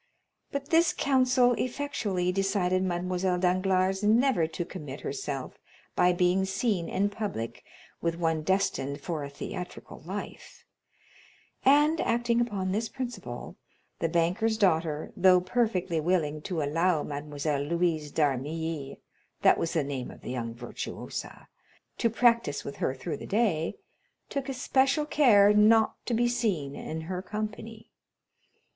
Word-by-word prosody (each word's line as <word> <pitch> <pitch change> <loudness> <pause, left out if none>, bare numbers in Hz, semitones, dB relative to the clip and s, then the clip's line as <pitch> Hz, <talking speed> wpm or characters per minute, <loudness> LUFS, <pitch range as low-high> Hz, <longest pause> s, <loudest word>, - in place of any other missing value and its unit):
But 280 -1 -4
this 330 -1 +4
counsel 255 -2 +3
effectually 220 -9 -1
decided 185 -1 +1
Mademoiselle 180 0 0
Danglars 185 +1 +1
never 220 -4 +3
to 165 +2 -4
commit 150 -7 -8
herself 135 -1 -5 0.4
by 180 0 +4
being 180 +1 +2
seen 190 -2 -1
in 200 +1 0
public 200 - -4 0.4
with 170 0 0
one 165 -2 0
destined 155 -6 0
for 155 -1 -4
a 140 - -5
theatrical 180 +5 -7
life; - - -8 1.0
and 295 +4 +5
acting 235 0 +1
upon 200 -6 -1
this 220 +4 -1
principle, 240 - -6 0.4
the 165 - 0
banker's 185 +7 +1
daughter, 160 -6 +1
though 185 -2 +6
perfectly 185 -3 0
willing 155 -3 0
to 165 -2 -2
allow 165 +2 +1
Mademoiselle 145 0 -3
Louise 160 -1 0
d'Armilly 150 +1 -1 0.5
(that - - +5
was 165 - -1
the 160 - +1
name 135 -3 -4
of - - -12
the - - -6
young 115 -2 -4
virtuosa) 120 0 -7 0.5
to 230 - +3
practice 235 -7 +2
with 140 - -7
her 130 - -1
through 160 +5 -4
the - - -9
day, 195 -7 +1 0.5
took 280 -1 -3
especial 270 +3 +2
care 210 -10 +5
not 215 +1 +4
to 240 - +1
be 240 +1 +3
seen 195 - -1
in 160 +1 -5
her 180 +3 -4
company. 215 +3 -6
185 Hz, 135 wpm, -28 LUFS, 160-225 Hz, 1.0 s, though